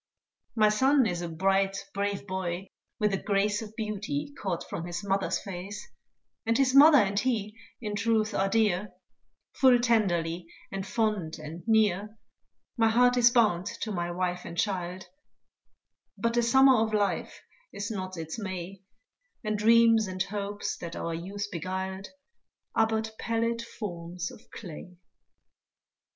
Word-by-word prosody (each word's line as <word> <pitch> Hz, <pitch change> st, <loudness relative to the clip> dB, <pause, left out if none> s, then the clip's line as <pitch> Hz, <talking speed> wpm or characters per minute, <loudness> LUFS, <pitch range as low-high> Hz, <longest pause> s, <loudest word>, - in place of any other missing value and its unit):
My 215 Hz, -2 st, +5 dB
son 265 Hz, +5 st, +4 dB
is 175 Hz, -5 st, -1 dB
a 175 Hz, -, -4 dB
bright, 195 Hz, +3 st, +1 dB, 0.2 s
brave 200 Hz, 0 st, -2 dB
boy, 185 Hz, -1 st, -4 dB, 0.3 s
with 210 Hz, -2 st, +1 dB
a 195 Hz, -, -1 dB
grace 205 Hz, +1 st, +1 dB
Of 220 Hz, -1 st, -9 dB
beauty 220 Hz, +7 st, -3 dB
caught 180 Hz, -4 st, -3 dB
from 170 Hz, -, -5 dB
his 175 Hz, +1 st, -4 dB
mother's 195 Hz, -1 st, 0 dB
face, 195 Hz, +2 st, -7 dB, 0.6 s
And 230 Hz, +1 st, +1 dB
his 265 Hz, -1 st, +3 dB
mother 290 Hz, +2 st, +9 dB
and 200 Hz, -4 st, +2 dB
he 215 Hz, -3 st, -1 dB, 0.2 s
in 210 Hz, -3 st, -4 dB
truth 225 Hz, 0 st, +1 dB
are 195 Hz, 0 st, +1 dB
dear, 210 Hz, -3 st, +1 dB, 0.6 s
Full 260 Hz, -2 st, +5 dB
tenderly, 180 Hz, -8 st, +1 dB, 0.2 s
and 195 Hz, 0 st, -4 dB
fond, 210 Hz, -6 st, -1 dB
and 155 Hz, +2 st, -8 dB
near 215 Hz, -1 st, +2 dB, 0.6 s
My 225 Hz, -1 st, +4 dB
heart 245 Hz, +2 st, +4 dB
is 245 Hz, -1 st, +6 dB
bound 210 Hz, -7 st, +2 dB
to 220 Hz, -, -2 dB
my 175 Hz, -3 st, -2 dB
wife 180 Hz, 0 st, -2 dB
and 170 Hz, -, -8 dB
child; 185 Hz, -2 st, -2 dB, 1.1 s
But 230 Hz, +3 st, 0 dB
the 240 Hz, -, +3 dB
summer 265 Hz, +2 st, +6 dB
of 220 Hz, -1 st, 0 dB
life 205 Hz, -1 st, -1 dB, 0.3 s
is 200 Hz, +2 st, -5 dB
not 185 Hz, -3 st, -5 dB
its 160 Hz, +5 st, -5 dB
May, 190 Hz, -1 st, -6 dB, 0.6 s
And 215 Hz, -1 st, -1 dB
dreams 225 Hz, 0 st, +5 dB
and 185 Hz, 0 st, -2 dB
hopes 205 Hz, 0 st, -4 dB
that 170 Hz, -1 st, -7 dB
our 165 Hz, -, -3 dB
youth 195 Hz, +5 st, -4 dB
beguiled, 190 Hz, +2 st, -4 dB, 0.7 s
Are 225 Hz, -, +3 dB
but 220 Hz, 0 st, -2 dB
pallid 230 Hz, 0 st, -1 dB
forms 175 Hz, -6 st, -6 dB
of -, -, -13 dB
clay. 180 Hz, -2 st, -10 dB
205 Hz, 145 wpm, -28 LUFS, 185-225 Hz, 1.1 s, mother